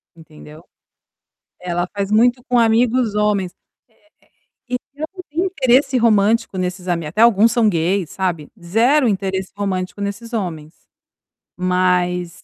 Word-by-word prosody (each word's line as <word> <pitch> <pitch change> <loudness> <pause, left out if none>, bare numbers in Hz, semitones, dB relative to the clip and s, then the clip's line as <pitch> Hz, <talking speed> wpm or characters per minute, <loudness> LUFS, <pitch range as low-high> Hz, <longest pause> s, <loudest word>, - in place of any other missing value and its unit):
Entendeu? 155 -1 -15 1.0
É, 180 0 -6
ela 175 +1 -1
faz 200 0 -2
muito 245 +3 +3
com 245 - +2
amigos 230 0 +2
homens. 205 -4 0 1.2
Eh, - - -2
eh, - - 0 0.2
e - - -16
eu 310 - -2
não 365 - -8
tenho 330 +5 -1
interesse 270 -6 +2
romântico 225 -1 +2
nesses 180 0 -4
ami 170 -3 -1
até 170 +8 -3
alguns 230 -1 +5
são 230 -3 +3
gays, 175 0 0
sabe, 175 -6 -3
zero 240 - +2
interesse 190 -2 -2
romântico 195 -1 -3
nesses 205 +4 -5
homens. 165 -8 -4 0.9
Mas 180 -1 0
200 Hz, 140 wpm, -19 LUFS, 180-230 Hz, 1.2 s, alguns